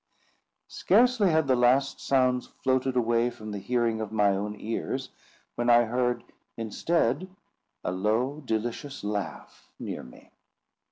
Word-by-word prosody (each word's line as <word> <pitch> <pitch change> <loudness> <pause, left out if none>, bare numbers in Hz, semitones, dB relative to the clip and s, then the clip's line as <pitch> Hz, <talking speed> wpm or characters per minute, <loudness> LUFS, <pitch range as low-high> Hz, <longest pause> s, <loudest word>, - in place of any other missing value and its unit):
Scarcely 245 -5 +3
had 160 -2 +3
the 130 -1 +3
last 125 +3 +3
sounds 130 -2 +2
floated 130 0 -1
away 120 0 +2
from 110 -3 -9
the 100 - -4
hearing 115 0 0
of 110 - -4
my 105 -2 +3
own 105 +2 -2
ears, 115 +1 -3 0.4
when 120 0 -1
I 120 0 +7
heard 120 +1 0 0.3
instead 140 - 0 0.5
a - - -1
low 110 +10 0
delicious 120 +4 -3
laugh 105 -5 -5
near - - -5
me. 60 - -15
120 Hz, 130 wpm, -27 LUFS, 110-130 Hz, 0.5 s, I